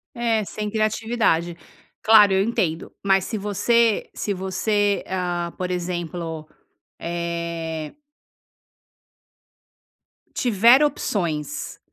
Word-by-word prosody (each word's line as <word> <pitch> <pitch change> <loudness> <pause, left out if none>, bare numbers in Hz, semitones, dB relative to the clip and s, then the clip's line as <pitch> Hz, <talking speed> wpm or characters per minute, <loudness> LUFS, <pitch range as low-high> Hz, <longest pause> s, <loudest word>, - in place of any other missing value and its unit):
É, 230 -3 0
sem 210 +1 -5
criatividade. 215 -6 0 0.5
Claro, 210 -2 +7
eu 190 0 +3
entendo, 195 -8 -1
mas 195 -1 +3
se 225 - -4
você 210 +3 +1
se 205 - -2
você, 200 +2 0
hã, 175 -2 -2
por 185 0 -3
exemplo, 170 -3 -4 0.5
eh 170 -2 -4 2.4
tiver 240 +3 +5
opções, 155 - -2
190 Hz, 85 wpm, -23 LUFS, 170-215 Hz, 2.4 s, Claro